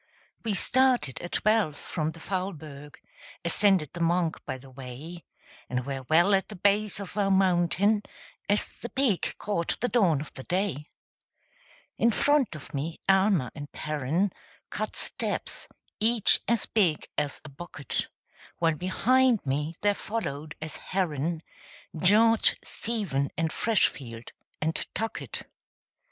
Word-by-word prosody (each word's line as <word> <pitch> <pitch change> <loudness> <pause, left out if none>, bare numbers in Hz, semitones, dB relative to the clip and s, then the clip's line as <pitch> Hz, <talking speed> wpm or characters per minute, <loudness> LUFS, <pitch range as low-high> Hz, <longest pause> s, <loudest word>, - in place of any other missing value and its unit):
We 220 -3 0
started 250 - +2
at 175 - -7
twelve 215 -8 +2
from 155 0 -3
the 165 - -12
Faulberg; 160 -6 -5 0.5
Ascended 180 -3 +4
the 175 - -7
Monch 170 0 +1
by 130 -2 -3
the 130 +1 -15
way; 135 +7 -9 0.4
And 125 0 -2
were 135 -2 -5
well 175 +5 +5
at 195 0 +2
the 210 - -8
base 200 +2 +2
of 200 -1 -7
our 200 -1 +2
mountain, 190 +2 +3 0.5
As 205 +1 +3
the 240 - -6
peak 255 -9 0
caught 170 -5 -2
the 245 - 0
dawn 190 - +3
of 150 - -8
the 130 - -8
day. 175 -2 -2 1.1
In 235 - +5
front 285 - +2
of 140 -5 -10
me 150 +4 -3
Almer 190 - +3
and 145 -2 -8
Perren 155 +6 -1 0.4
Cut - - -3
steps, - - -2 0.3
each 225 0 +5
as 235 -3 +2
big 180 -9 +1
as 145 -1 -1
a - - -8
bucket; 145 -1 -2 0.5
While 165 -1 +2
behind 245 - +2
me 150 +4 -1
there 205 0 +3
followed, 155 -9 -4
as 155 -1 -6
Herren, 165 -3 -2 0.5
George, 215 +7 +5
Stephen, 195 -12 -2
and 160 0 0
Freshfield, 125 - 0 0.3
and 160 +1 0 0.2
Tuckett. 225 0 -3
175 Hz, 135 wpm, -27 LUFS, 150-205 Hz, 1.1 s, well